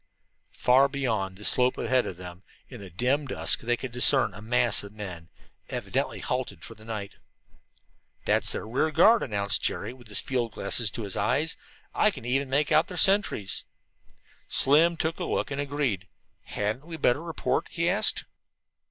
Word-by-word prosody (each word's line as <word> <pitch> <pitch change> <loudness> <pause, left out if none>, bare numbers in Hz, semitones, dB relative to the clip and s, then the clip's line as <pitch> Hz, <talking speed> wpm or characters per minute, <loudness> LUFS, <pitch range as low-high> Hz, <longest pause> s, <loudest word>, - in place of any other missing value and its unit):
Far 130 +3 +4
beyond 110 -9 -2
the 105 - -7
slope 125 0 +4
ahead 125 +1 +1
of 90 - -6
them, 90 0 -10 0.3
in 125 -5 -11
the 95 - -9
dim 130 - 0
dusk, - - +1
they 120 +1 0
could 130 -1 -6
discern 115 -4 +4
a 105 - -10
mass 120 +1 +1
of 100 - -10
men, 90 -6 -8 0.4
evidently - - -3
halted 130 0 -3
for - - -9
the 110 -1 -17
night. 110 -3 -6 1.1
"That's - - +2
their - - -4
rear 130 +7 0
guard," 210 +9 +5
announced 100 -4 +1
Jerry, 110 +4 -2
with 125 -3 -16
the 105 - -9
field 120 -2 -1
glasses 115 -3 0
to 115 +3 -5
his 100 -2 -6
eyes. 140 +10 0 0.4
"I - - +3
can - - -8
even 135 +2 0
make 145 +4 +1
out 155 +1 +4
their 180 - -8
sentries." 195 - +2 0.8
Slim 165 +5 +4
took 160 +2 -2
a 180 - -2
look - - -2
and 140 +1 -2
agreed. 140 -9 -2 0.4
"Hadn't 110 +9 -3
we 165 -1 -6
better 140 -1 +2
report?" 165 -1 -2
he 170 0 -1
asked. 200 +5 +1
125 Hz, 175 wpm, -27 LUFS, 105-145 Hz, 1.1 s, guard